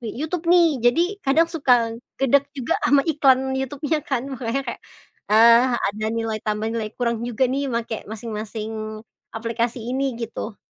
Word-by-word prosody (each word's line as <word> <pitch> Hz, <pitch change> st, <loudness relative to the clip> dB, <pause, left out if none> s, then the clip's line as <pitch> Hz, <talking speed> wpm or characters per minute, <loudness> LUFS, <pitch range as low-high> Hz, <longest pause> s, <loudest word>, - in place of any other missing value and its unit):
YouTube 310 Hz, +9 st, -4 dB
nih, 335 Hz, -6 st, +4 dB
jadi 245 Hz, +8 st, +3 dB, 0.2 s
kadang 315 Hz, +3 st, +3 dB
suka 245 Hz, -7 st, +3 dB, 0.2 s
gedek 275 Hz, +1 st, +2 dB
juga 255 Hz, -, -1 dB
sama 275 Hz, +2 st, +4 dB
iklan 265 Hz, -4 st, +3 dB
YouTube-nya 290 Hz, +4 st, -2 dB
kan, 265 Hz, -2 st, -1 dB
makanya 260 Hz, +2 st, -3 dB
kayak, -, -, -12 dB, 0.5 s
eee, 230 Hz, +3 st, +6 dB
ada 210 Hz, 0 st, -2 dB
nilai 225 Hz, -1 st, -2 dB
tambah, 210 Hz, 0 st, -2 dB
nilai 225 Hz, -2 st, -2 dB
kurang 235 Hz, -2 st, -1 dB
juga 245 Hz, +2 st, +1 dB
nih, 270 Hz, +2 st, -1 dB
makai 230 Hz, -3 st, -4 dB
masing-masing 215 Hz, 0 st, -6 dB, 0.3 s
aplikasi 230 Hz, +1 st, -2 dB
ini, 260 Hz, +1 st, -2 dB
gitu. 230 Hz, -2 st, -6 dB
240 Hz, 145 wpm, -22 LUFS, 225-275 Hz, 0.5 s, eee